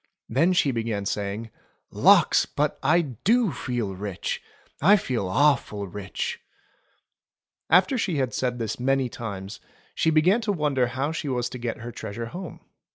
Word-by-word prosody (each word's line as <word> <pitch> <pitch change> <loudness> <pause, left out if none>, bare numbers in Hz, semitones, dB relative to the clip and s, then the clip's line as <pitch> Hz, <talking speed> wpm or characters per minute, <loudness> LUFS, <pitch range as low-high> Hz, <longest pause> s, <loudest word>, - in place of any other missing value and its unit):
Then 155 +10 +2
she 150 -6 +3
began 115 -4 -2
saying: 105 +3 -3 0.4
"Lawks! - - +5
But - - -1
I 175 - +4
do 190 - +1
feel 120 -7 -3
rich. 100 -1 -4 0.4
I 195 +8 +7
feel 125 - -1
awful 105 -3 +2
rich 100 +1 -4 0.7
!" - - -64
After 190 - +4
she 185 -7 0
had 130 -3 -1
said 125 -1 -1
this 110 -1 -3
many 135 0 +1
times, 100 -4 -7 0.3
she - - +1
began 170 +8 +4
to 215 -2 0
wonder 145 -8 +1
how 135 +5 -2
she 160 -3 -4
was 125 -2 -1
to 125 - -6
get 120 -1 -4
her 120 +1 -6
treasure 115 +1 -6
home. 175 +8 -8
125 Hz, 160 wpm, -25 LUFS, 110-155 Hz, 0.7 s, I